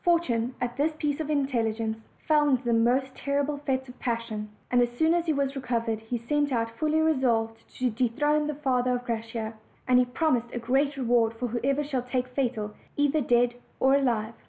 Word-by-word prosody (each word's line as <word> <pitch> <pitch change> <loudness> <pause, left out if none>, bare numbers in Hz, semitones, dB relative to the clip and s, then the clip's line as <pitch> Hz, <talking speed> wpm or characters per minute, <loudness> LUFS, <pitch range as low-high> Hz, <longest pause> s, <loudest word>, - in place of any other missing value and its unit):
Fortune, 255 -9 +1
at 245 0 -3
this 305 +2 +1
piece 295 -2 -1
of 310 -1 -3
intelligence, 230 -6 0 0.3
fell 300 -1 +4
into 250 -3 +1
a - - +3
most 250 +3 +2
terrible 285 +1 -1
fit 265 0 0
of 250 - -13
passion; 230 -3 -3 0.2
and 245 0 +4
as 240 - +2
soon 320 +3 +4
as 345 -1 0
he 315 - +3
was 280 -1 -1
recovered 230 -4 -1
he 225 +2 -4
set 290 +5 0
out, 230 -2 0
fully 310 0 +2
resolved 235 -8 +1
to 250 -1 +1
dethrone 295 +6 +1
the 300 - -2
father 255 -3 +1
of 245 0 -5
Graciosa, 225 -1 -3 0.3
and 250 -1 +5
he 250 - +4
promised 245 -2 0
a - - -3
great 270 +4 +1
reward 235 -3 +2
to 250 - -2
whoever 265 +5 0
should 260 -4 -3
take 255 0 -1
Fatal, 240 -5 -2 0.2
either 290 +1 +2
dead 240 -1 +3 0.3
or 265 +1 +4
alive. 235 -5 +1
250 Hz, 195 wpm, -27 LUFS, 230-285 Hz, 0.3 s, and